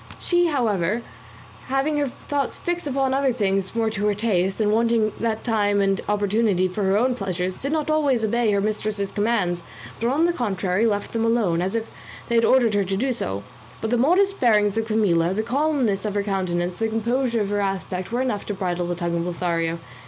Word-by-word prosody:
She, 350 -1 +2
however, 225 - 0 0.6
having 270 +3 0
her 290 -1 +1
thoughts 280 +1 -3
fixed 350 -2 -3
upon 270 -1 0
other 270 -1 +2
things 195 -4 -1
more 225 -1 +1
to 210 -1 -1
her 205 - +1
taste, 195 -3 0
and 210 -1 +2
wanting 225 -1 +2
that 225 -1 -1
time 205 -3 +1
and 195 -1 +1
opportunity 205 -2 +2
for 185 +3 -4
her 190 +1 +3
own 250 +3 +2
pleasures, 185 -4 -3
did 275 - -3
not 310 -1 0
always 280 -7 +2
obey 235 +1 +1
her 200 -1 +2
mistress's 210 -1 -2
commands, 205 -5 0 0.4
but 235 - 0
on 300 +6 +2
the 345 - +2
contrary 200 - 0
left 205 -2 -2
them 225 -1 0
alone, 220 -8 +2
as 190 +4 -2
if 225 -1 -1 0.4
they - - -1
had 230 0 +4
ordered 245 -4 +4
her 205 -1 +2
to 195 0 -2
do 260 +4 0
so; 100 - -3 0.4
but 220 - -3
the - - +3
modest 370 +10 +3
bearing 210 -4 +3
of 225 0 0
Camilla, 190 -5 +2
the 220 - 0
calmness 260 -4 0
of 210 -2 -3
her 205 - +1
countenance, 180 -3 -2
the 225 - +1
composure 230 +2 0
of 200 - -1
her 205 0 0
aspect 190 -1 -3
were 240 +2 0
enough 250 -6 -1
to 205 - -3
bridle 180 -2 -2
the 175 - -2
tongue 170 -1 -2
of 170 - -1
Lothario. 170 -1 -1
215 Hz, 210 wpm, -23 LUFS, 195-240 Hz, 0.6 s, had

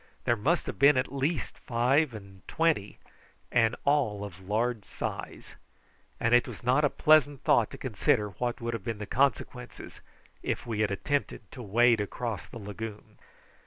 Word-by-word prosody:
There 120 - +2
must 150 +11 +1
have - - -6
been 140 0 +6
at 130 - -1
least 140 +3 -2
five 125 +3 +1
and 100 -2 -11
twenty, 160 -11 0 0.5
and 115 -1 +3
all 130 -9 +1
of 95 -3 -8
large 110 +4 -1
size; - - -6 0.6
and 115 +1 +1
it 120 - +5
was - - -9
not 130 +5 +3
a 145 - +4
pleasant 145 -3 +3
thought - - +3
to - - -9
consider 105 -1 +1
what 120 +5 -3
would 115 -1 -3
have 115 -4 -4
been 115 +1 -3
the 105 - -5
consequences 125 0 -2 0.4
if - - -3
we 115 -3 -3
had 105 -1 +2
attempted 140 +8 -2
to 130 - -9
wade 115 +1 +3
across 110 0 -4
the - - -10
lagoon. 105 0 -8
120 Hz, 165 wpm, -29 LUFS, 105-135 Hz, 0.6 s, been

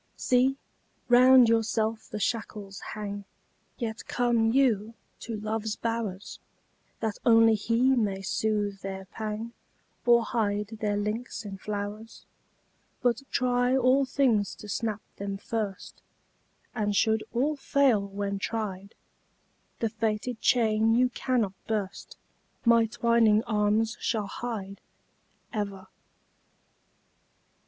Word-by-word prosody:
See! 255 +2 +2 0.5
round 250 0 +7
yourself 225 -1 0
the 215 - -5
shackles 210 -2 -3 0.2
hang, 205 -1 -5 0.5
Yet 230 -2 -5
come 235 -2 +2
you 230 -4 +2 0.2
to 225 -2 -5
love's 215 0 -2
bowers, 225 -4 -4 0.6
That 220 -2 -2
only 225 -1 +6
he 230 +4 +2
may 200 -5 -1
soothe 205 -1 -1
their 190 0 -6
pang 220 +3 -5 0.5
Or 235 -1 +5
hide 210 -3 -1
their 205 -2 0
links 215 +3 -3
in 195 -1 -7
flowers 210 +2 -6 0.8
But 245 +1 +2
try 250 +1 +2
all 265 +2 +4
things 240 -7 +1
to 210 - -11
snap 215 0 -2
them 200 0 -4
first, 210 -2 -5 0.7
And 210 -3 -1
should 220 +1 +2
all 280 +6 +1
fail 275 -6 +2
when 200 0 -4
tried, 200 -2 -4 0.9
The 225 - +1
fated 220 +2 -2
chain 225 -2 +3
you 250 +1 +4
cannot 240 -6 -1
burst 205 -4 -4 0.5
My 230 -1 +5
twining 225 -1 +3
arms 215 0 +1
shall 220 -3 -1
hide 200 -2 -6 0.7
Ever! 200 -3 -4
220 Hz, 110 wpm, -28 LUFS, 205-235 Hz, 0.9 s, round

